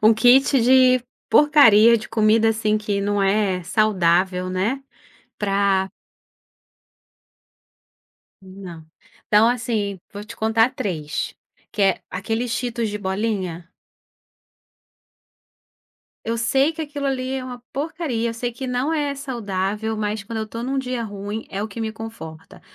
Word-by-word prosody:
Um 215 +1 +7
kit 255 +4 +5
de 255 +1 +5 0.3
porcaria, 235 -7 +6
de 220 - -7
comida 225 0 +3
assim 215 -1 +1
que 210 -1 -2
não 205 0 0
é 195 -2 +1
saudável, 185 -2 +1
né. 210 +9 -1 0.6
Pra 195 -1 +1 2.5
Não. 185 -4 -11 0.4
Então 215 +2 +5
assim, 225 -5 -2
vou 205 - -7
te 230 +2 -11
contar 225 +2 +2
3, 160 - -3 0.4
que 210 - -1
é: 195 -2 +2
aquele 225 +6 -2
Cheetos 235 -1 -2
de 210 0 -4
bolinha? 190 -3 -3 2.6
Eu 230 +1 -1
sei 265 +6 +2
que 320 - -5
aquilo 290 -2 -4
ali 260 -1 -2
é 265 -1 -4
uma 245 -1 -8
porcaria, 285 -6 -2
eu - - -7
sei 240 +1 -3
que 260 +3 -6
não 250 +5 -1
é 290 -3 -1
saudável, 220 -5 -3
mas 210 -1 -3
quando 225 +2 -5
eu 220 - -2
estou 230 +2 -7
num 270 +2 -2
dia 255 -2 -3
ruim, 205 +1 -6
é 195 - -4
o 215 - -4
que 220 +2 -8
me 220 -1 -3
conforta. 160 -8 -10
220 Hz, 135 wpm, -22 LUFS, 200-245 Hz, 2.6 s, Um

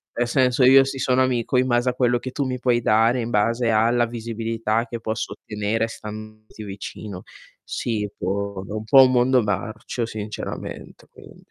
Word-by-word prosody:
Nel 120 0 0
senso, 125 +1 +2
io 135 +1 +7
si 135 0 -5
sono 130 0 +2
amico 125 0 0
in 130 +1 +2
base 120 +1 +2
a - - -1
quello 120 -1 +2
che 130 +1 -6
tu 140 0 -2
mi 130 -1 -3
puoi 120 -1 +2
dare, 115 +3 +3
in 115 0 -3
base 115 +3 +1
alla 115 +2 +3
visibilità 115 -1 -2
che 115 0 -7
posso 110 0 -3
ottenere 105 +2 -2
standoti 110 0 -10
vicino. 100 -1 -8 0.4
Sì, 105 -3 -2
boh, 100 0 -3
è - - -9
un 110 - -4
po' 135 +4 +7
un 130 - +2
mondo 125 0 +3
marcio 110 +3 -3
sinceramente, 110 -1 -7
quindi. - - -16
115 Hz, 175 wpm, -23 LUFS, 110-125 Hz, 0.4 s, io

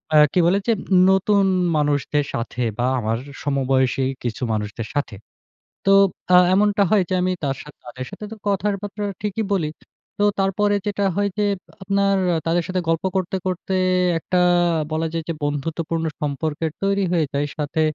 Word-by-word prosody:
আ - - +8 0.2
কি - - +3
বলে 190 +4 +3
যে 230 - +4 0.2
উম 180 - +6
নতুন 195 +1 +3 0.3
মানুষদের 145 0 +1
সাথে 120 +1 -4 0.2
বা 125 - +2
আমার 110 0 -1 0.3
সমবয়সী 135 -2 +1 0.2
কিছু 120 +2 -3
মানুষদের 105 +1 -4
সাথে। 145 -7 -2 0.7
তো 195 - +4 0.4
আ - - +9 0.2
এমনটা 205 +1 +3
হয় 210 -3 +4
যে - - -1
আমি 185 0 +1
তার 135 -1 0
সা 150 - -12
তাদের 125 +1 -7
সাথে 210 - -8
তো 225 - -6
কথার 200 +1 +1
বার্তা 205 0 -5 0.2
ঠিকই 210 +1 -2
বলি। 165 -6 0 0.5
তো 205 - +1 0.2
তারপরে 205 +2 +2
যেটা 205 0 -1
হয় 205 0 +1
যে 210 - +1 0.2
আ - - -71 0.2
আপনার 195 0 +2 0.2
আ - - +2
তাদের 170 +1 +2
সাথে 185 -1 -1
গল্প 165 -1 +1
করতে, 190 0 -1
করতে 185 +1 -2 0.4
একটা 180 +3 0 0.5
বলা 160 +1 0
যায় 165 -1 -2
যে - - 0
বন্ধুত্বপূর্ণ 160 +3 -2 0.2
সম্পর্কের 150 +2 -2
তৈরি 200 0 +1
হয়ে 165 -3 +2
যায়। 140 +1 0
সাথে 150 +1 -1
165 Hz, 175 wpm, -22 LUFS, 145-195 Hz, 0.7 s, আ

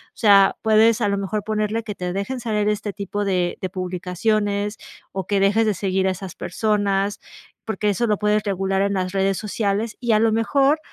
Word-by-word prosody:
sea, 200 -3 +5
puedes 220 +1 +4
a 205 - +2
lo 200 - 0
mejor 200 +1 -3
ponerle 215 +1 -1
que 210 -2 -6
te 180 -1 -4
dejen 200 +7 -3
salir 210 -3 0
este 210 -1 -2
tipo 205 +1 -3
de 180 -3 0
de 185 - -2
publicaciones, 200 +3 -1 0.4
o 190 -2 -4
que 200 -1 +1
dejes 205 +3 +3
de 215 - +2
seguir 190 0 0
a - - +2
esas 185 -1 -7
personas 200 +1 0 0.5
porque, 215 -1 -1
eso 235 +4 0
lo 210 -2 +1
puedes 210 +1 +1
regular 195 -1 -1
en 200 0 0
las 185 -1 -1
redes 195 -1 +1
sociales 210 +1 -2
y 240 -2 +1
a 215 - +4
lo 225 0 +3
mejor 275 +6 +2
205 Hz, 200 wpm, -22 LUFS, 195-215 Hz, 0.5 s, sea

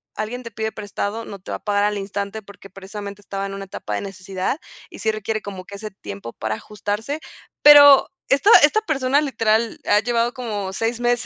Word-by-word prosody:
alguien 230 +4 -4
te 230 - -7
pide 220 +1 -3
prestado, 210 +1 -4
no 200 - -8
te 185 - -9
va - - -2
a - - -34
pagar 205 -1 +1
al 210 0 0
instante 200 +2 -4
porque 195 0 -14
precisamente 200 +1 -8
estaba 195 0 -4
en 195 - -7
una 195 0 -6
etapa 190 - -6
de - - -2
necesidad 195 - -4 0.3
y - - -11
sí 220 - +1
requiere 215 0 -3
como 190 -2 -7
que 200 - -10
ese 215 +1 -7
tiempo 100 - -9
para 110 0 -3
ajustarse. 210 - -4 0.4
Pero 285 -2 +9 0.2
esta 280 +10 +4
esta 430 +9 +5
persona, 280 -5 +1
literal, 225 -4 0
ha 205 0 +4
llevado 235 +1 0
como 210 -6 -4
6 230 +3 -2
meses 240 0 +1
215 Hz, 205 wpm, -21 LUFS, 200-240 Hz, 0.4 s, Pero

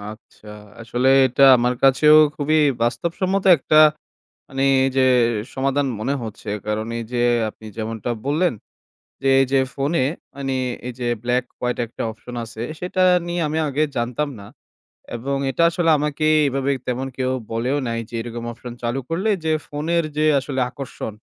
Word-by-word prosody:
আচ্ছা, 105 +1 -12 0.3
আসলে 120 +3 0 0.2
এটা 130 +2 0
আমার 125 +1 +1
কাছেও 150 +3 +6 0.2
খুবই 155 +2 +1 0.3
বাস্তবসম্মত 170 +11 -1
একটা, 155 +2 +2 0.7
মানে, 135 -1 -3 0.2
এই 135 - +1
যে 130 - +4 0.5
সমাধান 135 +1 0
মনে 135 +6 -1
হচ্ছে। 110 -1 -8 0.2
কারণ 105 +1 -2
এই 115 - -4
যে 120 - 0 0.3
আপনি 110 - -15
যেমনটা 115 +1 -4 0.2
বললেন 160 +6 +1 0.7
যে, 135 - +1
এই 135 - +3
যে 135 - +4 0.2
phone-এ, 140 -1 0 0.3
মানে, 135 -1 -3 0.3
এই 125 - -4
যে 125 - -3 0.2
black 125 +1 0 0.2
white 125 0 -2
একটা 115 - -7
option 125 +2 -11
আছে, 115 0 -8 0.2
সেটা 185 +1 -1 0.2
নিয়ে 175 0 -2
আমি 155 - -2
আগে 145 +2 0
জানতাম 125 +5 -1
না। 100 - -11 0.7
এবং 135 +4 -3
এটা 150 +6 0
আসলে 170 -1 +1
আমাকে 150 +1 -1 0.2
এভাবে 135 +1 -1 0.2
তেমন 125 +2 -2
কেউ 130 -1 -1 0.2
বলেও 120 +5 -1
নাই 115 0 -2
যে, - - -13
এরকম 120 0 -6
option 120 +1 -9
চালু 120 +3 -1
করলে 185 +6 -1 0.2
যে 160 - +1
phone-এর 165 +3 -1
যে 155 - +1 0.2
আসলে 135 -1 -4
আকর্ষণ 130 -5 -7
135 Hz, 160 wpm, -21 LUFS, 120-150 Hz, 0.7 s, কাছেও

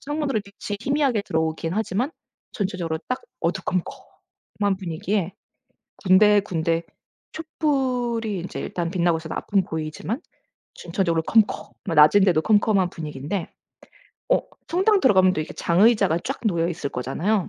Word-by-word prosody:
창문으로 290 -5 -2
빛이 200 +1 -7
희미하게 270 -3 +1
들어오긴 160 -2 -2
하지만 220 +5 -1 0.4
전체적으로 185 -6 -2
딱 255 - -2 0.2
어두컴컴한 190 +2 -3
분위기에 185 +1 -2 0.7
군데군데 185 -4 +3 0.5
촛불이 250 - -1
이제 180 - -6
일단 170 -2 -3
빛나고 175 -2 +1
있어서 160 0 -7
앞은 200 -2 +1
보이지만 160 - -4 0.5
전체적으로 170 -2 -1
컴컴한 220 +5 +1 0.2
낮인데도 170 +3 +6
컴컴한 205 -2 +3
분위기인데 155 +4 -5 0.8
어 - - +4 0.3
성당 385 +4 +3
들어가면 190 - +5
또 - - -1
이렇게 155 - -5
장의자가 195 -1 +3
쫙 270 - -3
놓여 170 -5 +1
있을 165 -4 -3
거잖아요. 175 - -1
190 Hz, 340 characters per minute, -23 LUFS, 165-220 Hz, 0.8 s, 낮인데도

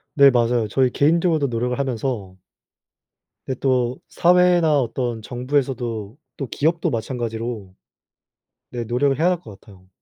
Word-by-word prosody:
네 140 -1 +8
맞아요. 120 -2 +1
저희 130 +4 +1
개인적으로도 160 +1 +2
노력을 125 0 -2
하면서 120 -7 -3 1.1
근데 130 - -4
또 130 -2 0
사회나 175 -3 +4
어떤 120 -2 -2
정부에서도 120 -3 -3 0.2
또 135 - -4
기업도 165 +7 0
마찬가지로 115 -5 -4 1.0
네 120 -1 -4
노력을 130 +4 +1
해야 165 - +2
할 180 -2 -1
것 105 - -12
같아요. 95 -4 -18
125 Hz, 305 characters per minute, -21 LUFS, 115-140 Hz, 1.1 s, 네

